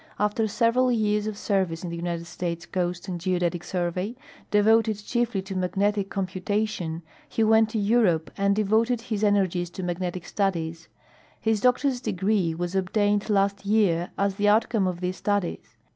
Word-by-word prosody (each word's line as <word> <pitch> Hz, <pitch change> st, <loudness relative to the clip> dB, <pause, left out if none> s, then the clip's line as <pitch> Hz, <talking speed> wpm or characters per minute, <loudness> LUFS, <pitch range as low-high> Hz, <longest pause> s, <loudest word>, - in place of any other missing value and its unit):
After 210 Hz, +2 st, +1 dB
several 230 Hz, +4 st, +2 dB
years 210 Hz, -2 st, +1 dB
of 215 Hz, -2 st, -4 dB
service 190 Hz, -6 st, -1 dB
in 175 Hz, -, -4 dB
the -, -, -4 dB
United 170 Hz, 0 st, -3 dB
States 170 Hz, -1 st, -4 dB
Coast 180 Hz, 0 st, -3 dB
and 175 Hz, -2 st, -4 dB
Geodetic 175 Hz, -1 st, 0 dB
Survey, 180 Hz, +5 st, -2 dB, 0.3 s
devoted 220 Hz, +1 st, +3 dB
chiefly 225 Hz, -1 st, -1 dB
to 195 Hz, 0 st, -6 dB
magnetic 195 Hz, +2 st, 0 dB
computa 195 Hz, +3 st, -1 dB
tion, 165 Hz, -5 st, -5 dB, 0.3 s
he 225 Hz, -, 0 dB
went 220 Hz, 0 st, +4 dB
to 220 Hz, -, -3 dB
Europe 200 Hz, -7 st, +2 dB
and 200 Hz, 0 st, +2 dB
devoted 220 Hz, +3 st, +2 dB
his 215 Hz, -3 st, -3 dB
energies 185 Hz, -4 st, +2 dB
to 185 Hz, +2 st, -7 dB
magnetic 175 Hz, 0 st, -3 dB
studies. 170 Hz, -5 st, -2 dB, 0.6 s
Ilis 220 Hz, -2 st, +2 dB
doctor's 250 Hz, 0 st, +2 dB
degree 195 Hz, -5 st, 0 dB
was 175 Hz, +1 st, -3 dB
obtained 205 Hz, +2 st, +1 dB
last 200 Hz, -1 st, +1 dB
year, 200 Hz, -5 st, +2 dB
as 200 Hz, -1 st, 0 dB
the 205 Hz, 0 st, +2 dB
outcome 215 Hz, -2 st, +2 dB
of 180 Hz, -1 st, -3 dB
these 180 Hz, +1 st, -2 dB
studies. 205 Hz, -4 st, -2 dB
200 Hz, 160 wpm, -25 LUFS, 180-215 Hz, 0.6 s, went